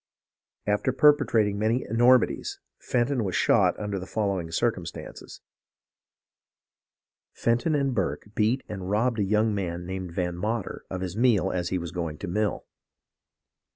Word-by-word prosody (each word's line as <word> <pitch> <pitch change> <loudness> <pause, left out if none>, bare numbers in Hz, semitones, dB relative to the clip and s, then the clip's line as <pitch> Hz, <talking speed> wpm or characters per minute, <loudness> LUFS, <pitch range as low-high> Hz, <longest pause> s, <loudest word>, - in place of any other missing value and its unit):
"After 105 +5 +1
perpetrating 120 -8 +3
many 110 +4 +1
enormities, 120 +3 +3 0.2
Fenton 125 0 0
was 95 -3 -2
shot - - +3
under 105 -2 -3
the 95 - -8
following 100 -6 -1
circumstances: 80 - -4 1.9
Fenton 120 +7 +1
and 140 -2 +1
Burke 100 0 -2
beat 115 +5 +1
and 95 -3 -6
robbed 110 +3 +1
a - - +2
young 105 +2 +2
man 90 -3 -3
named 95 -1 -5
Van 90 -1 -1
Mater 105 +3 -3
of 95 -1 -4
his 95 -1 -4
meal 110 -6 +3
as 90 -2 -2
he 95 - 0
was 85 -2 -5
going 85 -4 -4
to - - -6
mill. 105 +4 -1
105 Hz, 140 wpm, -26 LUFS, 95-115 Hz, 1.9 s, perpetrating